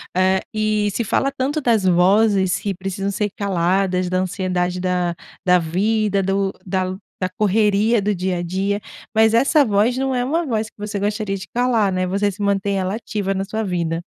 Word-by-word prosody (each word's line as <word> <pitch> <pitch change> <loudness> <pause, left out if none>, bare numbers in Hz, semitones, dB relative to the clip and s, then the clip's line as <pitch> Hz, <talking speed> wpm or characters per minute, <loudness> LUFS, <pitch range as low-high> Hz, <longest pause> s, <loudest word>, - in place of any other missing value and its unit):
Eh 190 +1 +3
e 215 -1 +1
se 235 - -1
fala 275 +5 0
tanto 280 +3 -2
das 230 -6 +2
vozes, 190 +1 +3
que 200 0 -2
precisam 195 +2 -3
ser 210 +1 -1
caladas, 185 -1 0
da 185 - 0
ansiedade, 180 -1 -1
da 180 -1 0 0.3
da 180 0 +5
vida, 200 +4 0
do 195 0 0
da 185 0 -1 0.3
da 185 - 0
correria 210 +2 +2
do 205 +1 0
dia 185 0 -1
a - - -2
dia. 195 +4 -1 0.3
Mas 220 0 +4
essa 275 +5 +4
voz 215 +1 +2
não 265 0 0
é 245 - +1
uma 325 +5 0
voz 220 -4 -1
que - - -49
você 210 0 -4
gostaria 205 0 -1
de 190 - -9
calar, 235 -5 +2
né? 185 0 -1
Você 200 +2 0
sim, 200 +2 -10
mantém 200 0 0
ela 190 +2 -1
ativa 205 -3 -3
na 195 - -2
sua 220 +2 -3
vida. 170 -4 -2
200 Hz, 190 wpm, -20 LUFS, 185-215 Hz, 0.3 s, da